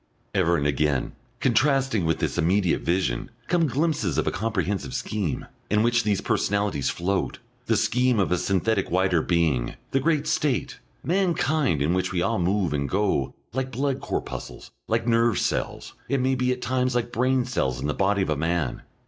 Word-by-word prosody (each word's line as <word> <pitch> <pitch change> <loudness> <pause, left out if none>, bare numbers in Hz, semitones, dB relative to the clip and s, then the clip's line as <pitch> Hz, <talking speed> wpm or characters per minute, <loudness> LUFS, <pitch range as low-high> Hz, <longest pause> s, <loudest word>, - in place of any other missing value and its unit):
Ever 85 +1 +3
and 70 - -1
again, 75 -1 +1 0.3
contrasting 130 - +2
with 80 -1 +1
this - - -2
immediate 90 +2 +2
vision, 85 -9 -1 0.2
come 170 -2 +2
glimpses 140 - 0
of - - +1
a - - +1
comprehensive 105 +2 -2
scheme, 105 - -2 0.2
in 105 +1 +3
which 120 0 +3
these 105 -2 +1
personalities 100 -8 0
float, 95 +2 -1 0.3
the 115 - +3
scheme 125 +1 +2
of 95 - +1
a 90 - +2
synthetic 100 +1 0
wider 90 -2 +2
being, 80 -9 +1 0.2
the 135 - +2
great 155 +1 +1
State, 140 -5 0 0.2
mankind, 160 - +1
in 80 +4 +1
which 95 0 0
we 90 -2 0
all - - 0
move 90 -2 +1
and 70 -1 -1
go, 95 -9 0 0.2
like 130 +1 -2
blood 135 +2 -1
corpuscles, - - -5 0.2
like 115 +1 0
nerve 115 -2 +3
cells, - - -2 0.2
it 140 - +1
may 130 +1 +2
be 125 -1 +1
at 125 0 -3
times 125 0 0
like 120 0 -1
brain 130 +1 +2
cells, 65 - -1
in 65 - -4
the 75 - 0
body 100 0 +1
of 95 - -3
a - - +2
man. 80 -3 -1
105 Hz, 180 wpm, -25 LUFS, 85-125 Hz, 0.3 s, Ever